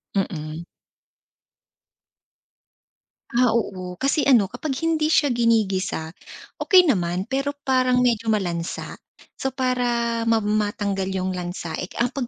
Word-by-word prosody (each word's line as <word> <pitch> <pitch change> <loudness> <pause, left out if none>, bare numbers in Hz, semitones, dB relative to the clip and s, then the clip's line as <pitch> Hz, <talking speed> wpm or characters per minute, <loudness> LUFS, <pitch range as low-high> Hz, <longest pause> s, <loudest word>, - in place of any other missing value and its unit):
Mm. 160 -4 -3 2.7
Ah, 240 -1 +3
oo. 185 -5 -3
Kasi 275 - 0
ano, 230 -8 +4
kapag 270 +3 -4
hindi 320 -2 +1
siya 295 -3 +3
ginigisa, 210 -8 +1 0.5
okey 370 -2 +6
naman, 180 - +1
pero 275 +2 -1
parang 255 -1 +2
medyo 230 -2 +1
malansa. 175 -6 -2 0.4
So, 265 - -1
para 240 -3 0
ma 225 -1 +4
matanggal 205 -2 -1
yung 190 -1 -2
lansa 175 -2 -5
eh, 180 - -4
kapag 245 +4 -2
230 Hz, 110 wpm, -23 LUFS, 185-255 Hz, 2.7 s, okey